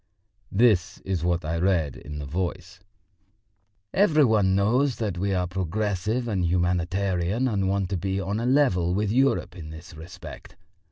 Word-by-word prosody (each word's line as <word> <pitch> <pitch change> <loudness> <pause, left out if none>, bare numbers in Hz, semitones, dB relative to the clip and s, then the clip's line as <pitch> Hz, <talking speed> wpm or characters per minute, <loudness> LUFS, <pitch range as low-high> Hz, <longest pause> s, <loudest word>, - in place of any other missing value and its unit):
This 105 -4 +3
was 95 -4 -2
what 85 -1 0
I 80 +2 -1
read 85 -6 +1
in 75 0 -8
the 75 - -5
Voice. 90 +4 -4 1.1
"Every 155 -7 +4
one 105 -5 +3
knows 120 +7 +2
that 105 -5 -3
we 100 +1 0
are 90 -1 +1
progressive 100 +5 -2
and 100 -5 0
humanitarian 90 +5 0
and 100 -5 0
want 95 -1 0
to 95 - -1
be 95 +2 -2
on 100 +3 -2
a 120 - -1
level 95 -11 +2
with 105 0 0
Europe 135 -5 +1
in 80 -4 -8
this 80 +2 -11
respect. 80 +3 -11
95 Hz, 160 wpm, -25 LUFS, 90-105 Hz, 1.1 s, Every